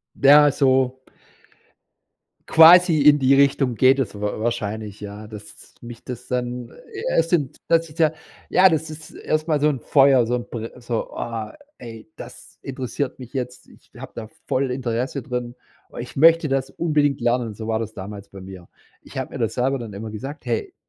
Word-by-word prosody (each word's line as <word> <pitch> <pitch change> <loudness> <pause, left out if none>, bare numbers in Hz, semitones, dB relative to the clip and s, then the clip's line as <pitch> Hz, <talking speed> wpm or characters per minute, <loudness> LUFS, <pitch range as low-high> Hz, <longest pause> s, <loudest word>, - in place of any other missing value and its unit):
Ja, 145 +1 +6
so 130 -2 +1 1.5
quasi 165 0 +7
in 145 0 +6
die 135 0 +4
Richtung 135 -2 +2
geht 130 +4 +4
es 105 -5 -3
wa 105 0 -3
wahrscheinlich, 110 -2 -4
ja. 105 +1 -8
Dass 105 -1 -13
mich 120 -1 -11
das 125 -1 -8
dann 125 -1 -3 0.2
äh, 410 0 -7 0.2
es 165 0 +1
sind 150 -7 0
das 165 0 +2
ist 150 +2 -16
ja 160 -2 +3 0.4
ja, 190 +1 +6
das 160 -2 -2
ist 155 0 -11
erstmal 155 -1 -1
so 150 - +3
'n 135 -4 -4
Feuer, 135 -2 +4
so 120 - -1
'n 120 -1 -3
br 115 +1 -7
so: 120 -1 -3
„Boah, 115 -2 -6 0.2
ey, 115 -2 -10
das - - -12
interessiert 130 0 -5
mich 125 -2 -11
jetzt." 125 -1 -5
Ich - - -22
hab - - -10
da 110 -2 -7 0.2
voll 130 0 0
Interesse 125 +2 -3
drin. 125 -2 -5 0.5
Ich - - -9
möchte 165 +1 +5
das 135 -1 -1
unbedingt 150 -4 0
lernen. 120 -2 0
So 110 +1 -8
war 110 0 0
das 110 -1 -6
damals 100 0 -9
bei 100 - -12
mir. 95 -2 -11 0.3
Ich - - -15
hab - - -4
mir - - -7
das - - -1
selber 135 +2 0
dann 115 -4 -8
immer 110 +2 -7
gesagt: 135 +9 -8
„Hey, 120 -3 -3
125 Hz, 185 wpm, -22 LUFS, 115-145 Hz, 1.5 s, quasi